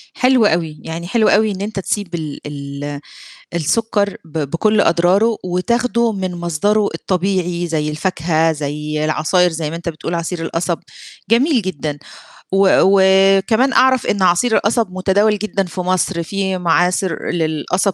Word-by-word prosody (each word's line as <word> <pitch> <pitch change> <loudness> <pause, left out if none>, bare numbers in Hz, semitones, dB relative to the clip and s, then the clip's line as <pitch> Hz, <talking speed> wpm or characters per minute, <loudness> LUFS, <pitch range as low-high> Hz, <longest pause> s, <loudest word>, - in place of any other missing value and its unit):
حلو 255 -3 +3
أوي، 160 -4 0
يعني 165 +1 -6
حلو 220 +2 +2
أوي 215 +1 +3
إن 195 - -6
أنت 205 0 -4
تسيب 195 -2 -3
ال 155 -3 -5
ال 145 0 -6 0.6
السُكّر 205 +5 0
ب 160 0 -7
بكلّ 210 +6 +2
أضراره 190 +7 +3
وتاخده 235 +5 0
من 185 -3 -4
مصدره 190 +5 0
الطبيعي 180 -1 -1
زي 155 -2 -2
الفاكهة، 160 0 0
زي 150 +1 -3
العصاير 160 +4 +2
زي 155 -2 -3
ما 165 - -5
أنت 170 0 -5
بتقول 165 +1 -5
عصير 170 +1 -3
القصب، 165 +1 -2 0.5
جميل 250 0 +3
جدًا، 150 -5 -4 0.5
و 195 0 +4 0.7
وكمان 230 +7 +1
أعرف 260 -1 +3
إن 200 - -1
عصير 185 +6 +3
القصب 220 -2 +1
متداول 200 +3 +1
جدًا 200 -1 -2
في 180 0 -5
مصر، 180 -1 0
في 190 +1 -2
معاصر 180 +1 0
للقصب 170 +4 -1
180 Hz, 145 wpm, -17 LUFS, 165-205 Hz, 0.7 s, و